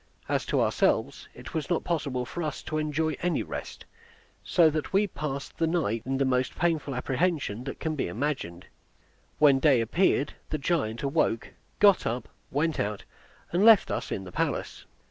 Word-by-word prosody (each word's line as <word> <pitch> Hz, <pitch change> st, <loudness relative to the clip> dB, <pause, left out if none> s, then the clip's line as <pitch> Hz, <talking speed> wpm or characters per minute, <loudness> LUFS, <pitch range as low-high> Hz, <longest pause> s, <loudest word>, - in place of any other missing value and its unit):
As -, -, -1 dB
to -, -, +1 dB
ourselves, -, -, +1 dB
it 125 Hz, +1 st, -10 dB
was 160 Hz, -2 st, -3 dB
not 175 Hz, -, +1 dB
possible 140 Hz, -7 st, -2 dB
for 175 Hz, -, -6 dB
us 150 Hz, -3 st, -4 dB
to 155 Hz, -, -2 dB
enjoy 155 Hz, 0 st, -1 dB
any 175 Hz, 0 st, 0 dB
rest, -, -, -7 dB, 0.6 s
so 170 Hz, -3 st, +4 dB
that 155 Hz, 0 st, -3 dB
we 195 Hz, +2 st, +3 dB
passed 145 Hz, -7 st, -5 dB
the 165 Hz, -, +2 dB
night 160 Hz, -10 st, 0 dB
in 135 Hz, 0 st, 0 dB
the 135 Hz, -, +2 dB
most 125 Hz, 0 st, 0 dB
painful 160 Hz, -6 st, 0 dB
apprehension 130 Hz, -, -1 dB
that 135 Hz, -, -6 dB
can 160 Hz, -, -2 dB
be 145 Hz, -, -1 dB
imagined. 105 Hz, -, -3 dB, 0.7 s
When 140 Hz, -3 st, +5 dB
day 135 Hz, -3 st, +4 dB
appeared 145 Hz, -, +1 dB, 0.2 s
the 155 Hz, -, -1 dB
giant 140 Hz, -6 st, -1 dB
awoke, 140 Hz, -5 st, 0 dB, 0.3 s
got 200 Hz, -2 st, +5 dB
up, 115 Hz, 0 st, -3 dB, 0.2 s
went 155 Hz, +3 st, 0 dB
out, 105 Hz, 0 st, -2 dB, 0.5 s
and 180 Hz, +4 st, +2 dB
left 225 Hz, -2 st, +7 dB
us -, -, -3 dB
in 95 Hz, -, -3 dB
the 90 Hz, -, -9 dB
palace. -, -, -2 dB
145 Hz, 175 wpm, -27 LUFS, 125-165 Hz, 0.7 s, left